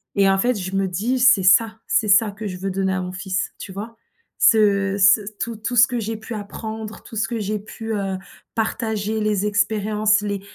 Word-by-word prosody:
et 195 -1 +4
en 195 - +3
fait 245 +4 +2
je 190 0 -4
me 195 0 +1
dis: 220 +8 -1
«C'est 245 -6 +5
ça, 220 +4 +4
c'est 220 - +1
ça 210 +1 +4
que 210 +1 -7
je 185 -2 -6
veux 195 +1 -3
donner 190 0 -1
à 185 - -1
mon 180 0 -5
fils», 185 0 -3
tu - - -8
vois? 210 +4 -7 0.4
Ce 200 -3 +3
ce 205 +2 +6 0.2
tout 230 0 -3
tout 225 +3 -4
ce 230 0 +8
que 245 -2 -3
j'ai 225 0 -4
pu 220 +2 -8
apprendre, 220 +1 -7
tout - - -12
ce 225 +1 0
que 235 -3 -3
j'ai 210 0 -2
pu, 225 +2 -7
heu, 195 -2 -2 0.4
partager, 220 -1 -2
les 210 -2 0
expériences, 210 0 +1
les 200 -1 -3
210 Hz, 215 wpm, -21 LUFS, 195-225 Hz, 0.4 s, ce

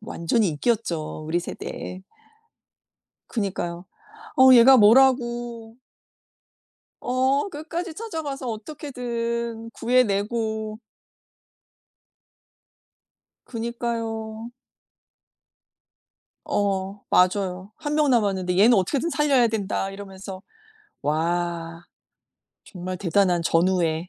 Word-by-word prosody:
완전히 210 0 0
인기였죠 160 -4 -2
우리 170 +2 0
세대에. 185 +1 -7 1.3
그러니까요. 185 -5 -3 0.5
어우 260 0 +8
얘가 255 +3 +8
뭐라고. 240 -1 +3 1.2
어 260 +7 +1
끝까지 330 +2 -5
찾아가서 310 - -5
어떻게든 235 -2 -4
구해내고. 220 -2 0 2.7
그러니까요. 230 -1 -4 2.0
어 195 0 -1
맞아요. 185 +1 +1
1 295 0 -3
명 300 -1 +3
남았는데 190 -6 +1
"얘는 225 +5 +6
어떻게든 275 - 0
살려야 275 -6 +3
된다." 200 -2 -2
이러면서 195 -1 -9 0.6
와 170 +2 -2 0.8
정말 185 -1 -6
대단한 180 -1 +2
전우애. 170 -1 +1
220 Hz, 195 characters per minute, -24 LUFS, 185-245 Hz, 2.7 s, 어우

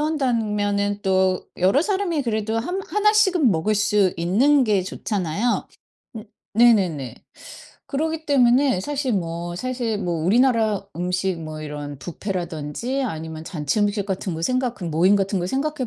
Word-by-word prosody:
온다면은 210 -9 0
또 190 -1 +1
여러 190 - +3
사람이 380 -5 -1
그래도 220 -2 -1
한 360 +11 -3
1 420 +1 +3
씩은 380 - +4
먹을 185 +6 0
수 210 -2 +2
있는 245 +12 +3
게 205 -4 +2
좋잖아요. 195 +3 -2 0.5
음 215 - -7 0.3
네네네. 190 - +3 0.7
그러기 315 +2 -2
때문에 255 -5 +3
사실 275 +1 -2
뭐 170 -2 -3
사실 245 -1 -2
뭐 180 -4 -2
우리나라 225 -1 +2
음식 180 0 -1
뭐 155 -1 -7
이런 145 -1 -6
뷔페라든지 175 - -4
아니면 160 -6 -5
잔치 155 +1 -2
음식 205 0 0
같은 190 -2 -3
거 160 - -5
생각 255 +2 0
그 205 - -13
모임 170 +4 +3
같은 195 0 0
거 175 - -2
생각해 275 +3 -2
205 Hz, 290 characters per minute, -22 LUFS, 180-255 Hz, 0.7 s, 씩은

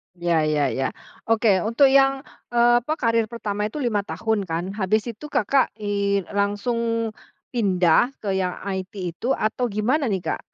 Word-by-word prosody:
Ya 170 -3 +1
ya 145 -4 +1
ya, 130 +2 -2 0.3
oke, 220 -4 +3
untuk 265 +4 +4
yang, 270 0 +4 0.2
eee, 240 0 +4
apa, 260 +6 -2
karir 230 -5 +1
pertama 210 -2 -3
itu, 290 +6 -5
5 220 -4 +1
tahun 205 0 -2
kan, 165 +1 -2 0.2
habis 210 +2 +1
itu, 230 +7 -10
Kakak, 270 0 +1
eee, 200 -2 -1
langsung 230 +3 -1 0.4
pindah 200 +2 +2
ke 200 - -1
yang 185 -1 -1
IT 190 0 -4 0.2
itu, 240 +10 -1
atau 235 +3 -1
gimana 245 +8 0
nih, 190 -5 -1
Kak, - - -2
215 Hz, 160 wpm, -23 LUFS, 190-240 Hz, 0.4 s, untuk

